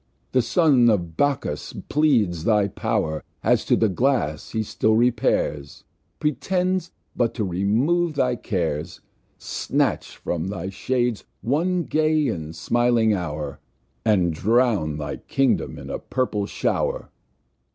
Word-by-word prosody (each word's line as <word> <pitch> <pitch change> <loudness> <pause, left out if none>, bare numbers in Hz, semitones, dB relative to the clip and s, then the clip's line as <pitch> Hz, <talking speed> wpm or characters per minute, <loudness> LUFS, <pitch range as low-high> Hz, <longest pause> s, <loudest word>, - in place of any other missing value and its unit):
The 130 - +3
Son 125 -1 +4
of 85 -7 0
Bacchus 140 - -1
pleads 115 - +2
thy 105 -3 +3
Pow'r, 80 -4 -1 0.2
As - - +3
to - - +3
the 110 - +3
Glass 95 - 0
he 110 -1 -1
still 110 +1 +1
repairs, 110 - 0 0.4
Pretends 180 +5 0 0.3
but 120 -2 0
to 110 - -1
remove 120 - +1
thy 125 -3 +1
Cares, 85 -7 -3 0.4
Snatch - - -1
from 85 0 -3
thy 95 -2 -4
Shades 120 +2 -1 0.2
one 170 +8 +1
gay, 155 -1 +2
and 80 -1 -5
smiling 120 -2 +2
Hour, 75 -6 -4 0.4
And 95 -7 +2
drown 105 -5 +1
thy 75 -1 -4
Kingdom 135 -4 0
in - - -8
a - - -3
purple 105 -6 -2
Show'r. - - -1
115 Hz, 125 wpm, -23 LUFS, 90-140 Hz, 0.4 s, Son